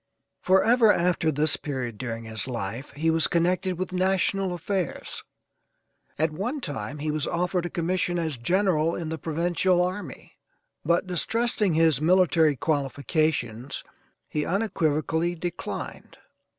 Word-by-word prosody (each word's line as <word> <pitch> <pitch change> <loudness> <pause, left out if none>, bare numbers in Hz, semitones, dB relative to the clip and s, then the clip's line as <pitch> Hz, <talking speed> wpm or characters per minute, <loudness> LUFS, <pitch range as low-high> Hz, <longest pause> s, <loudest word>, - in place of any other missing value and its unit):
Forever 220 +4 +5
after 170 -3 +2
this 150 +1 +2
period, 125 -7 -4
during 115 -2 -4
his 110 0 -5
life, 115 +1 -4
he 160 +2 +1
was 160 0 +3
connected 180 +2 +1
with 185 0 -4
national 190 +1 +1
affairs. 180 -1 -3 0.9
At 160 +1 +1
one 230 - -3
time 140 - -5
he 150 +1 -2
was 155 0 -1
offered 180 0 0
a - - -8
commission 175 +1 -1
as 160 -4 -1
General 170 - +1
in 165 -2 -4
the 160 0 -4
Provincial 175 +3 +1
Army, 185 +3 -4 0.4
but 170 +2 +2
distrusting 210 +1 0
his 160 -4 +3
military 165 -3 +4
qualifications 140 -3 -1 0.4
he 150 - -2
unequivocally 165 -3 0
declined. 175 +1 -6
165 Hz, 125 wpm, -26 LUFS, 150-185 Hz, 0.9 s, Forever